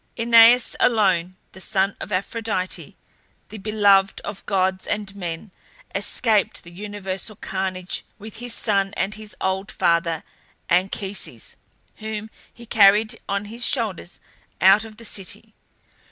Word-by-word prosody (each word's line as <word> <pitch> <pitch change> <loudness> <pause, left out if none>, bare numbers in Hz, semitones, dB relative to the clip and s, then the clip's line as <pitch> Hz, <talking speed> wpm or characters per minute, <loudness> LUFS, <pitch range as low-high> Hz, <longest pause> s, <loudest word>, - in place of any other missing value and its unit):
AEneas 230 +1 +6
alone, 185 -6 +2 0.2
the 190 - -10
son 195 +1 0
of - - -7
Aphrodite, 200 -1 -2 0.5
the 215 - -8
beloved 200 -2 +3
of 200 -1 -7
gods 190 -1 0
and 205 -1 -3
men, 175 +1 -6 0.4
escaped 220 -5 +1
the 170 - -13
universal 200 +1 -5
carnage 185 -1 -3
with 215 0 -10
his 245 +1 -3
son 200 -3 +1
and 200 - -1
his 215 -1 -8
old 190 +2 -2
father 170 -1 +1 0.5
Anchises, 190 +2 -2 0.4
whom 220 0 -6 0.2
he 235 - -14
carried 215 -1 +4
on 200 +1 -1
his 230 +3 -7
shoulders 220 -10 -2 0.4
out 195 +3 +6
of 215 -1 -12
the 230 - -9
city. 210 +2 -5
200 Hz, 125 wpm, -22 LUFS, 190-220 Hz, 0.5 s, AEneas